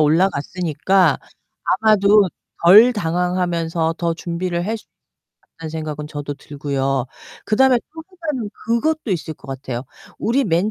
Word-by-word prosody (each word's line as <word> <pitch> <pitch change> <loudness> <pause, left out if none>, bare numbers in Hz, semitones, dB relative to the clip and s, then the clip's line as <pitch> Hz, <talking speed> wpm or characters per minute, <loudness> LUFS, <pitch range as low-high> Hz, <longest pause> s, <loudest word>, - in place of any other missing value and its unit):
올라갔으니까 170 +2 +2 0.5
아마도 210 -2 +4 0.4
덜 215 +8 +8
당황하면서 170 -3 -1
더 170 -1 0
준비를 175 +1 -3
할 225 +1 -1
수 - - -18 0.7
있겠다는 160 -1 -7
생각은 155 -2 -5
저도 145 -1 -5
들고요. 135 -2 -2 0.4
그다음에 250 +3 +4 0.2
또 320 - -7 0.2
하나는 260 -10 -3
그것도 240 +3 0
있을 160 -3 -2
것 135 - -17
같아요. 130 -2 -5 0.3
우리 260 +5 +1
맨 180 +3 +1
175 Hz, 295 characters per minute, -20 LUFS, 155-210 Hz, 0.7 s, 덜